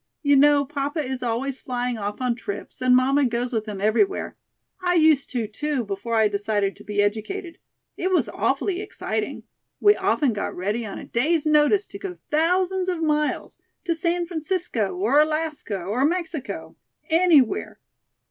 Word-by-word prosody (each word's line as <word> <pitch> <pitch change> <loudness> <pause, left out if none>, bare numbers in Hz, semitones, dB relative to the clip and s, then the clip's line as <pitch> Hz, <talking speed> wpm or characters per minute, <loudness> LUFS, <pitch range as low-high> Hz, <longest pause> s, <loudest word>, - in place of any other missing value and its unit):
You 285 -1 +4
know 285 +1 +5
papa 290 +2 -2
is 260 0 -4
always 250 +3 -2
flying 245 -2 -2
off 205 +3 -4
on 250 -1 +1
trips 225 +1 -7
and 255 0 +5
mamma 270 +3 +3
goes 245 +1 -1
with 220 -1 -1
him 205 -2 -5
everywhere. 225 - +1 0.5
I 355 0 +2
used 310 -4 +4
to, 240 -4 -2
too, 270 +5 -2
before 205 +3 -3
I 220 -1 +5
decided 205 -1 -1
to 210 - -13
be 205 -1 0
educated. 330 - -3 0.4
It 370 - -1
was 370 - +2
awfully 385 -1 -1
exciting. 415 - -4 0.4
We 415 0 +6
often 345 - +1
got 205 - -3
ready 210 +5 -2
on 200 - -6
a - - -8
day's 305 +6 +1
notice 305 +7 +4
to 395 - -9
go 385 -3 -6
thousands 365 +4 +1
of 345 -3 -2
miles, 300 -1 -1 0.2
to 345 - 0
San 345 +1 0
Francisco 315 - -2
or 230 +10 +3
Alaska 305 -9 0
or 205 +9 -1
Mexico, 325 -4 -3 0.4
anywhere. 325 -7 +3
280 Hz, 165 wpm, -24 LUFS, 225-335 Hz, 0.5 s, We